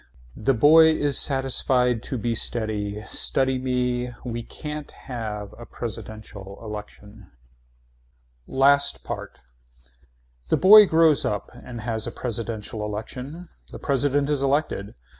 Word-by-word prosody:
The 130 +5 0
boy 160 +6 +7
is 145 -2 +1
satisfied 130 -3 +2
to 130 - -2
be 115 +1 -2
steady. 105 -2 -1
Study 130 +3 +1
me. 125 -1 -1 0.2
Why 120 -1 -4
can't 150 +4 -7
we - - -19 0.2
have 105 -4 -5
a 120 - -10
presidential 105 -3 -8
election. 105 -1 -10 1.2
LAST 140 +1 +3
PART - - -7 1.1
The - - +3
boy 210 +2 +8
grows 160 -4 +4
up 105 -1 -3
and 120 -2 -9
has 110 -1 -1
a - - -4
presidential 115 -2 -5
election. 125 +11 -7 0.2
The - - -8
president 140 0 0
is 145 -2 0
elected. 140 -7 -1
125 Hz, 120 wpm, -24 LUFS, 110-140 Hz, 1.2 s, boy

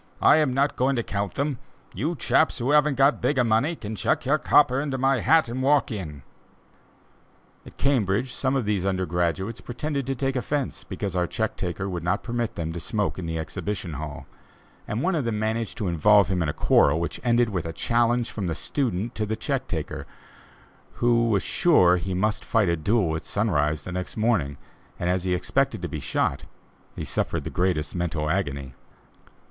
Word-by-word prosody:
I - - +7
am 150 -4 +2
not 140 +3 +1
going 130 +2 +2
to 120 - 0
count 100 -1 -3
them! 140 -2 -1 0.3
you 150 - -2
chaps 155 +1 +2
who 125 +3 0
haven't 150 -2 +3 0.2
bigger 135 -3 +2
money 120 +9 +2
can 110 -6 -6
chuck - - 0
your 150 +4 +2
copper 135 -3 +4
into 140 -2 -2
my 135 0 +2
hat 160 +4 +4
and 120 +3 -4
walk 140 0 +3
in." 75 - -6 1.4
At - - -14
Cambridge, 125 -2 +1
some 135 0 0
of 130 -5 0
the 100 -3 0
under 95 -1 0
graduates 90 +6 -1
pretended 140 +2 -3
to 135 - -1
take 135 +1 -1
offence 140 +2 -2
because 100 -3 -4
our 90 -1 +1
check - - -2
taker 90 +3 -3
would 90 -3 -3
not 95 +5 -1
permit 120 -1 -2
them 80 -1 -3
to 85 - -5
smoke 105 +1 -2
in 85 - -5
the 80 0 -2
exhibition 90 +2 -4
hall, 75 +1 -6 0.6
and 110 +5 -2
one 190 - +1
of 155 -5 0
them 115 -3 -1
managed 110 +1 -2
to 105 -6 -2
involve 95 +4 +4
him 90 -2 0
in 80 - 0
a - - +1
quarrel 75 +1 +3
which 85 - -3
ended 120 -1 +3
with 90 -5 -3
a - - -3
challenge 120 +5 +1
from 100 -4 -3
the 80 - -2
student 120 -4 -2
to 110 -1 -2
the 110 - -1
check - - -2
taker, - - -4 0.9
who 120 -1 +2
was 100 -5 +2
sure 90 - +4
he 90 +1 -3
must 105 +3 0
fight 105 -5 +2
a 85 - +2
duel 85 0 +1
at 80 - -4
sunrise 75 -8 0
the 90 - -6
next 90 +4 -4
morning, 105 - +1 0.4
and 90 0 0
as 90 0 -1
he 90 -1 +1
expected 115 +5 0
to - - -1
be 80 - -5
shot, 70 0 -1 0.5
he - - -5
suffered - - -2
the - - -5
greatest 90 -4 0
mental 85 -3 -1
agony. 70 -8 -2
105 Hz, 195 wpm, -25 LUFS, 90-125 Hz, 1.4 s, I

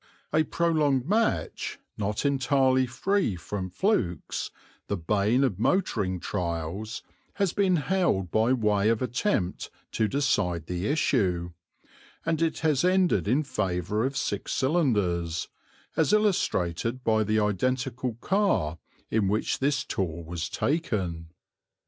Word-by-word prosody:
A 155 - +5
prolonged 155 -6 +1
match, 220 +4 0 0.2
not 105 +4 -2
entirely 135 -2 +3
free 195 - 0
from 95 +2 -5
flukes, 90 - -1 0.4
the 100 - -1
bane 105 +9 +2
of 105 -9 0
motoring 105 - +1
trials, 85 +4 -3 0.3
has 200 -4 +1
been 195 -3 +3
held 150 - +1
by 110 +3 +3
way 105 -4 +2
of 115 +1 +1
attempt 125 - -1 0.2
to 110 - +1
decide 100 - 0
the 90 +3 -3
issue; 95 - +1 0.7
and 165 -1 0
it 165 -1 0
has 155 -3 +2
ended 185 - +3
in 135 +8 +2
favour 100 - -1
of 135 +2 -1
six - - -2
cylinders, 105 - +1 0.5
as - - +2
illustrated 125 - +1
by 110 -2 +3
the 110 +1 +1
identical 125 +4 -1
car 110 - +1 0.3
in 110 -3 +2
which 105 +3 0
this 140 0 +1
tour 85 - -3
was 85 0 -4
taken. 95 - -1
115 Hz, 125 wpm, -27 LUFS, 95-145 Hz, 0.7 s, A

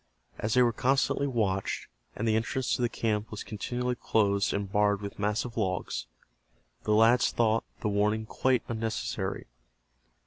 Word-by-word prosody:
As 105 +2 0
they 125 - +6
were 120 -1 +2
constantly 135 +3 +1
watched, 100 -7 -1 0.3
and 115 - -2
the 110 - +3
entrance 115 +3 0
to - - -3
the 120 - +2
camp 110 -2 -1
was 105 - -6
continually 125 +3 -2
closed 100 -4 +1
and 100 -1 -3
barred 105 -1 +3
with 100 0 -7
massive 105 +3 -1
logs, 90 - -2 0.8
the 105 - +2
lads 115 +3 +5
thought 115 -1 +2 0.2
the - - -1
warning 105 +2 +1
quite 130 +3 +1
unnecessary. 115 -1 -3
110 Hz, 150 wpm, -29 LUFS, 105-120 Hz, 0.8 s, they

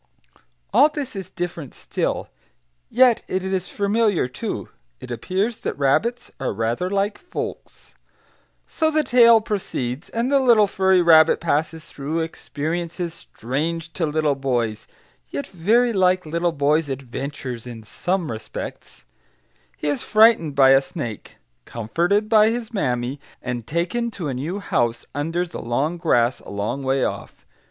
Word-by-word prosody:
all 300 - +6
this 290 -6 -5
is 190 -2 -6
different 175 -7 -5
still, - - -2 0.6
yet 250 -1 +4
it 185 0 -2
is 190 -1 -2
familiar, 205 - +1
too; 125 - -5 0.3
it 125 - -9
appears 190 - -2
that - - -4
rabbits 230 - +1
are 135 - -2
rather 115 - -1
like 200 +1 -1
folks. 360 - -7 0.7
So 315 -1 0
the 310 0 +2
tale 235 -4 +6
proceeds, 155 - -3
and 235 +4 -1
the 280 - +5
little 235 -5 +5
furry 190 -2 +3
rabbit 160 -1 +6
passes 160 0 -1
through 150 +4 -3
experiences 165 +2 -4
strange 160 +3 -4
to 165 - -1
little 150 -1 +1
boys, 120 -5 -2 0.4
yet 140 - -4
very 220 +7 +2
like 185 -2 +2
little 170 +2 0
boys' 150 0 +1
adventures 130 -2 -5
in 115 -2 -8
some 175 - -2
respects; 110 0 -8 0.7
he - - -4
is 145 - 0
frightened 215 -9 +4
by 135 -1 +6
a 135 0 +6
snake, 130 - -7 0.3
comforted 170 - 0
by 215 -1 +5
his 235 0 -4
mammy, 125 - -1 0.2
and 120 -2 -5
taken 175 +9 -1
to 180 -9 -5
a - - -2
new 150 +10 -3
house, 120 - -1
under 165 +5 -1
the 170 - -8
long 135 +9 -1
grass 120 -7 +2
a - - -13
long 105 +7 -3
way 135 0 +1
off. - - -6
165 Hz, 145 wpm, -22 LUFS, 135-200 Hz, 0.7 s, all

